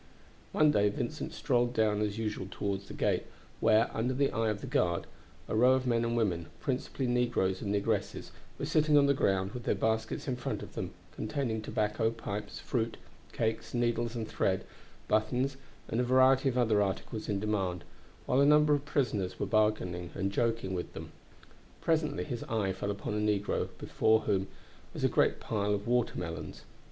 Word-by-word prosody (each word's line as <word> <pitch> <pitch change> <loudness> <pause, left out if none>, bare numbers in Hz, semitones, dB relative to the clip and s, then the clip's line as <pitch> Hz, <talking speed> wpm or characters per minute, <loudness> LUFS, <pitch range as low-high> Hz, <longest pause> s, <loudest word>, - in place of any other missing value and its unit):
One 155 -1 +4
day 105 -5 +3
Vincent 100 - -4
strolled 120 0 +1
down 105 -1 +2
as 105 0 -1
usual 105 -4 -3
toward 100 -1 -2
the - - -8
gate, - - 0 0.3
where, 110 +1 +4
under 125 +3 0
the 140 +1 +2
eye 115 -1 +1
of 105 -1 -2
the - - -5
guard, 85 -1 +1 0.4
a - - -2
row 125 +4 +6
of 130 0 +1
men 120 -2 +2
and 115 0 0
women, 90 -7 0
principally 130 0 -2
negroes 120 -6 +1
and 100 - -2
negresses, 105 0 -1 0.3
were - - -3
sitting 155 -1 +3
on 140 - +6
the 140 - +4
ground 95 -6 +1
with 125 - -6
their - - +2
baskets 110 +4 -1
in 130 -2 -1
front 125 - -3
of - - -10
them - - -3 0.2
containing 110 0 -2
tobacco, 110 +1 0
pipes, 105 -2 -5
fruit, 115 -2 -2 0.3
cakes, 110 +1 -2
needles 120 0 0
and 115 -2 -3
thread, 95 0 0 0.4
buttons, 125 +6 +1 0.3
and 115 - 0
a - - +2
variety 130 +2 +5
of 125 - -2
other 110 -4 +3
articles 105 +3 -3
in 100 -2 0
demand, 95 -4 -1 0.4
while 130 - +3
a - - +6
number 150 0 +6
of 145 -1 +1
prisoners 105 -11 -1
were - - 0
bargaining 105 -5 +1
and 100 0 -1
joking 115 -3 0
with 90 -1 -4
them. - - -8 0.7
Presently 155 -3 0
his 125 -6 -4
eye 105 -4 0
fell 95 +2 -4
upon 100 +1 -3
a - - -1
negro 105 -1 0
before 110 0 +2
whom 95 -2 0 0.5
was - - -4
a - - +6
great - - +2
pile 105 -2 0
of 100 - -5
watermelons. 90 -9 -2
110 Hz, 185 wpm, -31 LUFS, 100-125 Hz, 0.7 s, row